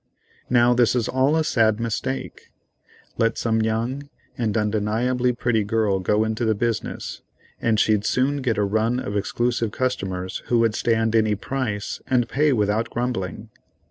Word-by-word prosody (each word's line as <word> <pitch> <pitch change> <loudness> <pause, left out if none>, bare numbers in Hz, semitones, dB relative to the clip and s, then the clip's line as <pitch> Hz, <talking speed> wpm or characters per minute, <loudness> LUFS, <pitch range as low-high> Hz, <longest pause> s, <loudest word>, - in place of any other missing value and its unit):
Now 120 0 +4
this 120 0 +3
is 120 -3 0
all 130 +4 +2
a 160 - +2
sad 110 -6 +2
mistake. 115 +4 -4 0.7
Let 115 0 +2
some 110 -1 +1
young 120 +6 -2 0.3
and 115 -3 -1
undeniably 110 +4 +1
pretty 120 -2 0
girl 105 -2 +1
go 105 +4 +1
into 110 +2 -2
the 110 -1 +2
business, 115 0 -3 0.4
and 110 -2 +2
she'd 105 -2 +2
soon 135 +6 +1
get 130 -6 -1
a 105 - +2
run 110 +4 +1
of 100 -4 -4
exclusive 120 +3 0
customers 95 -8 -3
who 120 - +2
would 115 -1 +3
stand 115 0 +1
any 110 -1 +3
price 105 -2 -3
and 125 -3 +2
pay 150 +4 +2
without 110 -1 +1
grumbling. 115 -4 -3
115 Hz, 155 wpm, -23 LUFS, 105-125 Hz, 0.7 s, Now